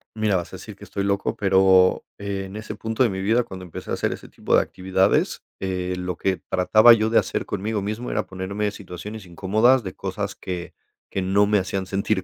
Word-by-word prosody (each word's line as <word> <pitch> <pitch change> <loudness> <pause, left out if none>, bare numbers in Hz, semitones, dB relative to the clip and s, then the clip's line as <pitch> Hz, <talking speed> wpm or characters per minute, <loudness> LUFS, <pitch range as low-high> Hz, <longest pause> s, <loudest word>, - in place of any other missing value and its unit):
Mira, 110 -2 +1
vas 90 0 -2
a - - -5
decir 105 +2 -10
que 100 - -15
estoy 100 -1 -4
loco, 100 0 0
pero 95 -2 +4
en 100 -1 -5
ese 110 0 -6
punto 110 +3 0
de 120 - +3
mi 95 -1 -4
vida, 115 +5 +2
cuando 95 -4 -9
empecé 85 - -8
a - - 0
hacer - - 0
ese - - -10
tipo - - 0
de - - +6
actividades, 95 0 +1 0.2
eh, 90 -1 -2
lo 90 -1 -3
que 95 -1 0
trataba 110 +5 +6
yo 110 -1 +2
de 115 - +6
hacer - - -2
conmigo 105 +2 -2
mismo 110 +4 -4
era - - -1
ponerme 100 +3 -3
situaciones 100 +2 -8
incómodas, 110 +9 +3
de 95 -2 -6
cosas - - -4
que 90 -2 -6 0.4
que 95 - -2
no 95 +2 +3
me 105 0 +3
hacían 95 0 -2
sentir 100 0 -1
100 Hz, 210 wpm, -23 LUFS, 95-105 Hz, 0.4 s, de